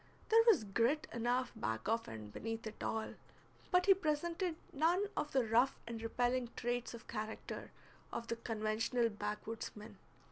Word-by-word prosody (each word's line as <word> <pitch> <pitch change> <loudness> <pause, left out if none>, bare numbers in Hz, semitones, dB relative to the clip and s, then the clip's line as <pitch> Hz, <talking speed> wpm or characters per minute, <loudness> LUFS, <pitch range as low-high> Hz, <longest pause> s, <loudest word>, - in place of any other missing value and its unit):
There 455 0 +7
was 380 - +7
grit 235 +9 +2
enough 245 +2 +1
back 110 - -2
of 225 +1 +1
and 105 -2 -7
beneath 225 0 -4
it 220 0 -7
all, 220 0 -1 0.6
but 360 0 +4
he 395 - +9
presented 340 +1 0 0.2
none 335 +7 +3
of 295 - -1
the 260 -3 +3
rough 240 +5 +3
and 230 -1 -5
repelling 245 +2 +1
traits 240 0 -2
of 235 - -12
character 215 -1 -5 0.4
of 235 - -3
the 230 - -2
conventional 225 +1 0
backwoods 210 +1 -4
man. 210 0 -10
235 Hz, 155 wpm, -37 LUFS, 220-290 Hz, 0.6 s, he